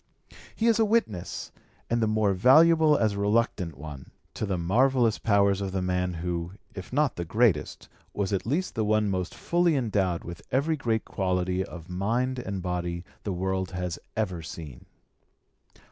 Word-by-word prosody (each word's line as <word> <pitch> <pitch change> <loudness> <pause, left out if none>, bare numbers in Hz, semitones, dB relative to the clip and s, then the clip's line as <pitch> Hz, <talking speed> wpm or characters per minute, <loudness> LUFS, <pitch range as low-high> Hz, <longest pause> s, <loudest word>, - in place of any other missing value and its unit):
He 225 - -1
is 230 -1 +4
a - - +5
witness, 205 - -1 0.4
and 120 0 0
the 110 - +2
more 110 -2 +2
valuable 155 - +6
as 110 -2 +2
a 100 - -4
reluctant 100 - 0
one, 70 -2 -9 0.2
to 110 - -3
the 95 -2 -1
marvellous 115 +6 +2
powers 100 -2 +3
of 95 -1 -3
the 95 - 0
man 90 -1 -1
who, 85 +1 -3 0.2
if 95 -2 -8
not 145 0 +1
the 85 - -2
greatest, 105 -2 +1 0.2
was 100 -1 -2
at 95 - 0
least 165 +9 -1
the 110 - 0
one 105 -1 +2
most 90 -1 -3
fully 175 -2 +2
endowed 100 -9 0
with 85 0 -8
every 140 +5 +1
great 115 -6 -1
quality 90 -1 -1
of 85 -2 -10
mind 115 +8 -1
and 100 -6 -4
body 90 -1 -3 0.2
the 100 - -3
world 95 0 -1
has 90 -1 -3 0.2
ever 95 -6 -1
seen. 80 -5 -9
100 Hz, 170 wpm, -27 LUFS, 90-120 Hz, 0.4 s, valuable